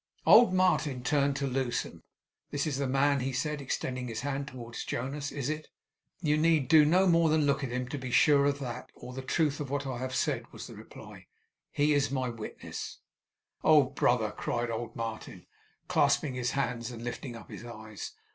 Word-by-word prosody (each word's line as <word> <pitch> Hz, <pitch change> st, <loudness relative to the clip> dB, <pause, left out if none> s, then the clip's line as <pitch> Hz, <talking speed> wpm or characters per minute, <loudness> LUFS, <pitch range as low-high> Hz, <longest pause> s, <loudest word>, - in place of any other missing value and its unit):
Old 240 Hz, -5 st, +8 dB
Martin 180 Hz, -8 st, +2 dB
turned 140 Hz, 0 st, +2 dB
to 140 Hz, -, -1 dB
Lewsome: 130 Hz, -2 st, -2 dB, 0.5 s
'This 140 Hz, -1 st, -1 dB
is 145 Hz, -4 st, -1 dB
the 140 Hz, -, 0 dB
man,' 140 Hz, +2 st, +2 dB
he 130 Hz, +1 st, -1 dB
said, 145 Hz, +3 st, -2 dB
extending 130 Hz, -1 st, -3 dB
his 115 Hz, -2 st, -4 dB
hand 140 Hz, 0 st, -3 dB
towards 120 Hz, -4 st, -7 dB
Jonas. 140 Hz, +4 st, -3 dB
'Is 140 Hz, -3 st, -3 dB
it?' 155 Hz, 0 st, -3 dB, 0.5 s
'You 150 Hz, -3 st, +2 dB
need 160 Hz, -4 st, +3 dB
do 155 Hz, +1 st, +7 dB
no 180 Hz, +5 st, +4 dB
more 170 Hz, -2 st, +4 dB
than 155 Hz, -1 st, +3 dB
look 140 Hz, -1 st, +1 dB
at 135 Hz, -, -2 dB
him 125 Hz, +1 st, -2 dB
to 145 Hz, -, -4 dB
be 130 Hz, -1 st, -5 dB
sure 140 Hz, +3 st, +5 dB
of 140 Hz, 0 st, +1 dB
that, 125 Hz, -4 st, -6 dB
or -, -, -10 dB
of -, -, -10 dB
the -, -, -3 dB
truth 145 Hz, +2 st, 0 dB
of 145 Hz, -3 st, -4 dB
what 140 Hz, 0 st, -2 dB
I 130 Hz, -3 st, -4 dB
have 130 Hz, 0 st, -3 dB
said,' -, -, -1 dB
was -, -, -8 dB
the -, -, -10 dB
reply. -, -, -12 dB, 0.4 s
'He 150 Hz, +1 st, +2 dB
is 145 Hz, 0 st, +2 dB
my 130 Hz, -2 st, -1 dB
witness.' 115 Hz, -2 st, -7 dB, 0.7 s
'Oh, 155 Hz, -2 st, +7 dB
brother!' 125 Hz, -4 st, +1 dB
cried 120 Hz, 0 st, -2 dB
old 115 Hz, 0 st, -4 dB
Martin, 115 Hz, -1 st, -6 dB, 0.4 s
clasping 140 Hz, -, +2 dB
his 125 Hz, 0 st, -2 dB
hands 125 Hz, -4 st, -1 dB
and 120 Hz, -2 st, -8 dB
lifting 120 Hz, +1 st, -5 dB
up 115 Hz, -, -11 dB
his -, -, -8 dB
eyes. 110 Hz, -3 st, -8 dB
135 Hz, 200 wpm, -30 LUFS, 125-145 Hz, 0.7 s, Old